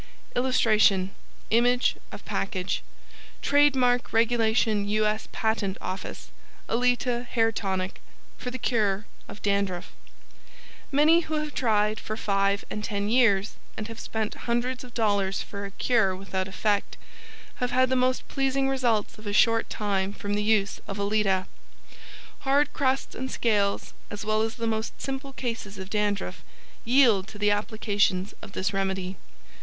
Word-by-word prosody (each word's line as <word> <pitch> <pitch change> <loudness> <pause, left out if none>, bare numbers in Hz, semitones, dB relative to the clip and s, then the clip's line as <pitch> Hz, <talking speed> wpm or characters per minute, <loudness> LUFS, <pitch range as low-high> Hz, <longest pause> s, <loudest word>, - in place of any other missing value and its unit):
] - - -29
[Illustration: 215 -6 +3 0.4
Image 245 +2 +3 0.2
of - - -10
package.] 190 -1 -2 0.6
TRADE 290 0 +5
MARK 245 -1 +2
REG. 230 +1 +3 0.3
U. 215 0 +1
S. 215 +1 -1
PATENT 220 -3 -1
OFFICE 185 +1 -6 0.4
ALETA 245 0 +1
HAIR 225 -2 +2
TONIC 190 -3 -3 0.3
For 250 - -5
the 255 - -5
Cure 215 -5 0 0.2
of - - -11
DANDRUFF 200 -3 0 1.0
Many 305 +4 +5
who 315 -2 -3
have 300 -1 -2
tried 215 -3 +1
for 215 - -5
five 200 -1 +1
and 210 - -4
ten 205 0 -2
years, 215 -4 +3 0.2
and 215 - -4
have 225 - -8
spent 220 -1 -3 0.2
hundreds 245 +2 0
of 245 -1 -13
dollars 200 -4 +1
for 200 -2 -6
a - - -5
cure 195 -2 +2
without 190 0 -3
effect, 205 +1 -1 0.6
have 250 - -1
had 255 +1 +3
the 260 - +2
most 255 0 +1
pleasing 270 0 0
results 240 -6 0
in 215 - -9
a - - -1
short 225 +2 +4
time 200 -2 -1
from 205 0 -4
the 205 - +1
use 210 -2 +2
of 195 - -5
ALETA. 200 -2 +1 0.9
Hard 280 +2 +2
crusts 265 -1 0
and 260 +1 -4
scales, 205 -5 0 0.2
as 205 0 -6
well 215 0 +2
as 225 +1 -1
the 230 - -3
most 220 0 -2
simple 270 0 -4
cases 225 -6 -4
of 190 0 -8
dandruff, 205 -3 -1 0.4
yield 230 -6 +4
to 215 - -10
the 205 0 +2
applications 205 -2 0
of 200 -2 -10
this 190 +2 -1
remedy. 190 -1 -2
215 Hz, 150 wpm, -27 LUFS, 200-245 Hz, 1.0 s, TRADE